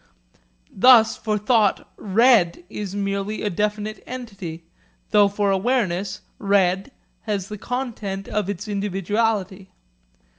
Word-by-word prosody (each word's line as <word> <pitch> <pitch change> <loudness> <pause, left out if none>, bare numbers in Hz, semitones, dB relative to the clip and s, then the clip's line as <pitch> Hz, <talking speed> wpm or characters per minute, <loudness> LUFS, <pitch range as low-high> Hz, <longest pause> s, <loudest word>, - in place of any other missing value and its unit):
Thus 230 +1 +6
for 215 -1 -2
thought 210 -1 +2
'red' 210 -4 +3
is 200 -3 -5
merely 200 +1 -2
a 210 - -1
definite 210 +3 -2
entity, 200 -10 -7 0.5
though 205 -1 +6
for 200 0 0
awareness 195 -3 0 0.2
'red' 195 0 +2 0.4
has 195 -2 -2
the 210 -1 -7
content 220 -6 -4
of 205 -2 -2
its 205 +2 -5
individuality. 200 -1 -1
205 Hz, 110 wpm, -22 LUFS, 195-215 Hz, 0.5 s, Thus